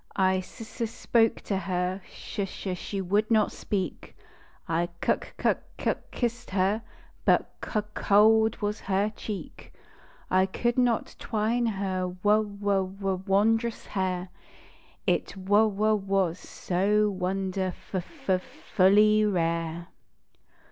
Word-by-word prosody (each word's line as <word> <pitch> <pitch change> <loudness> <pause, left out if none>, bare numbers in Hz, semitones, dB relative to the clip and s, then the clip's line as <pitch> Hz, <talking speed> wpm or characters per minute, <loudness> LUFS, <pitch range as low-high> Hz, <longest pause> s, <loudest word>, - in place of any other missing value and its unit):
I 190 -1 +3
s 220 +5 -8
s 230 - 0
spoke 225 0 +2
to 195 - -2
her; 180 +1 -2
sh 200 - -5
sh 185 0 -4
she 195 +2 -4
would 205 +4 +1
not 220 -2 +3
speak. 190 -6 -4 0.5
I 170 +1 0
knk - - -1
kuk - - +1 0.2
kuk - - 0
kissed 240 0 -3
her, 195 +3 +1 0.4
but - - +3
c - - -6
c - - -21
cold 220 +2 +4
was 205 +1 -1
her 200 +2 0
cheek. 210 -3 -7 0.6
I 185 +1 +4
could 240 +5 0
not 240 -3 +1
twine 230 +2 0
her 190 -3 -2
w 210 +1 +4 0.2
w 195 -2 0
w 190 -2 -1
wondrous 225 +4 +2
hair 185 -2 -2 0.8
It - - 0
w 205 +3 +3
w 215 +2 +2
was 195 -4 0
so 205 +3 +1
wonderf 185 0 -3
f 270 - -6
f 185 -1 +3
fully 210 +4 +3
rare. 170 -3 -1
195 Hz, 130 wpm, -27 LUFS, 185-215 Hz, 0.8 s, cold